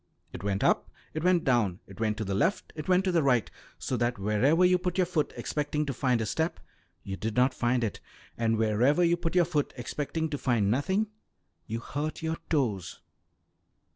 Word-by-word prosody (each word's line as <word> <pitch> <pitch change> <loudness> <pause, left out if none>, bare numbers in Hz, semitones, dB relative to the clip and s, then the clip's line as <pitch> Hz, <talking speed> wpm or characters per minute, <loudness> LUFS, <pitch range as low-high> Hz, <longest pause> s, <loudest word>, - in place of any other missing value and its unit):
It 85 - -7
went 100 -1 -1
up, - - +2 0.2
it 155 - -3
went 180 -2 +3
down, 110 -8 +2
it 95 +1 -14
went 110 -1 0
to 110 - -3
the 100 - -2
left, 170 - 0
it 155 -1 -6
went 185 +1 +4
to 190 - +1
the 170 -2 +3
right, 125 -6 +2 0.3
so 130 - -3
that 120 0 0
wherever 120 - +3
you 180 0 +4
put 180 0 -2
your 185 - +4
foot 165 -4 -1
expecting 150 0 -1
to 140 - -2
find 125 -1 +1
a - - -1
step, 160 +10 -1 0.4
you 95 - -4
did 110 +2 -4
not 130 +1 +3
find 120 0 +1
it, 110 - -2 0.4
and 115 -1 +1
wherever 115 +9 +3
you 170 0 +4
put 170 0 -3
your 175 -1 +5
foot 150 -4 -1
expecting 150 +6 -3
to 145 - -2
find 110 -5 +2
nothing, 190 - +1 0.6
you 115 +1 -3
hurt 150 +6 -4
your 160 0 -1
toes. 105 - -1
135 Hz, 200 wpm, -28 LUFS, 110-165 Hz, 0.6 s, your